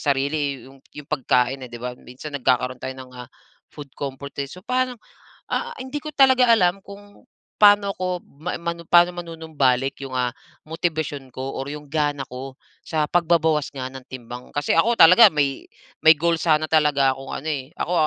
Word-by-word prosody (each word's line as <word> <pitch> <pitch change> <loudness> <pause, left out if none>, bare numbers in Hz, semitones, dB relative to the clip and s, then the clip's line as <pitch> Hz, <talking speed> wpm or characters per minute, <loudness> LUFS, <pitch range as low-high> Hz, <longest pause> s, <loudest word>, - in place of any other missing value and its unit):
sarili 140 -1 -1
'yong 135 0 -18 0.2
'yong 145 -1 -10
pagkain, 130 -2 +1
eh, - - -9
'di 120 - -8
ba? 125 0 -5
Minsan 140 +4 -8
nagkakaroon 125 0 0
tayo 130 - -4
ng, 130 -1 -11
ah, 125 -1 -9 0.4
food 145 -2 -10
comfort, 140 0 -6
eh, 140 - -6
so 180 - -11
paano, 255 0 -1 0.6
ah, 480 0 -2
hindi 260 +3 -5
ko 305 - -6
talaga 260 -3 +5
alam 185 -4 +3
kung 205 +2 -14 0.3
paano 205 -1 +6
ako, 180 -1 -3 0.2
ma 180 - -3
manum 170 0 -4
paano 175 0 +6
manunumbalik 150 -6 -1
'yung, 130 - -8
ah, 125 -1 +1 0.4
motibasyon 155 -4 -3
ko 135 +1 -5
or 135 - -4
'yong 150 0 -8
gana 145 -2 0
ko 130 +2 -8 0.3
sa 155 -2 0
pagbabawas 160 -3 +2
nga 130 -2 -5
ng 130 -1 -11
timbang. 125 -1 -9
Kasi 145 0 0
ako 230 +8 +4
talaga 180 +7 +9
may 140 -2 -1 0.4
may 160 0 +9
goal 170 +2 +1
sana 155 -2 +2
talaga 145 -4 +3
akong 135 0 -9
ano, 155 - -5
eh. 140 -3 -3
Ako 175 - -2
150 Hz, 180 wpm, -22 LUFS, 135-175 Hz, 0.6 s, talaga